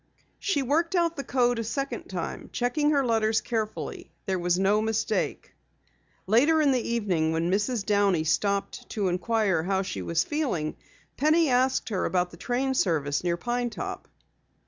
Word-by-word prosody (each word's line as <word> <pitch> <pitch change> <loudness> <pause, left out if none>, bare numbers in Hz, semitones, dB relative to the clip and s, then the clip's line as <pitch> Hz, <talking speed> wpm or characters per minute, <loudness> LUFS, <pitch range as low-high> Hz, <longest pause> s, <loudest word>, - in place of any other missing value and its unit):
She 290 -9 0
worked 330 +8 +1
out 340 -1 +2
the 275 - -4
code 245 -3 +1
a - - -1
second 275 +6 -3
time, - - -5
checking 275 +5 +1
her 280 -3 +2
letters 220 -2 +2
carefully. 220 -2 -4 0.2
There 190 -3 -1
was 175 0 +1
no 200 +3 +3
mistake. 220 0 -1 0.7
Later 275 +11 +4
in 295 -3 +4
the 255 -2 +2
evening 190 -10 0
when 165 +2 0
Mrs. 210 +2 0
Downey 200 -5 +2
stopped 200 +5 -1
to 205 -5 -1
inquire 190 -1 +1
how 190 +3 0
she 185 -1 -5
was 165 -1 +1
feeling, 245 - -2 0.4
Penny 310 +2 +3
asked 255 +1 +2
her 195 -4 -1
about 180 -1 0
the 170 - -12
train 260 +7 -1
service 155 - 0
near 175 -1 0
Pine 240 +4 -1
Top. - - -6
220 Hz, 165 wpm, -27 LUFS, 185-260 Hz, 0.7 s, Later